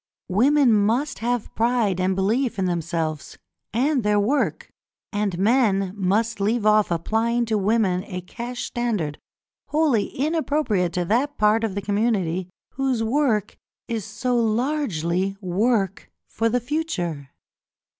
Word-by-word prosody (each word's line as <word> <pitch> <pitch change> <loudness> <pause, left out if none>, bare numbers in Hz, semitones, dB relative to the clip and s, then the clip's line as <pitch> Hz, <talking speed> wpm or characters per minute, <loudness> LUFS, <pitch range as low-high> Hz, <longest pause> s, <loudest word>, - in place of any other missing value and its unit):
Women 255 +6 +4
must 225 +8 +1
have 240 0 -2
pride 225 -5 +1
and 185 +1 +1
belief 225 +5 0
in 190 - 0
themselves 165 -4 -3 0.3
and 260 +5 +1
their 210 -1 +2
work, 260 +9 0 0.4
and 205 -3 -1
men 195 -3 +2
must 210 +3 0
leave 215 +2 0
off 215 -1 +4
applying 225 +8 0
to 220 -1 0
women 195 -3 +1
a 180 -2 -5
cash 240 +6 -6
standard 210 -12 -2 0.5
wholly 295 -9 +2
inappropriate 285 - 0
to 180 0 -1
that 265 +9 0
part 215 +2 +3
of 215 -4 -2
the 200 - -3
community 200 -4 0 0.2
whose 260 -4 -1
work 225 -4 0 0.3
is 230 -3 -3
so 235 +5 -2
largely 215 - 0
work 195 +1 0 0.2
for 230 +1 -1
the 245 +2 +1
future. 200 - -3
215 Hz, 130 wpm, -23 LUFS, 190-245 Hz, 0.5 s, Women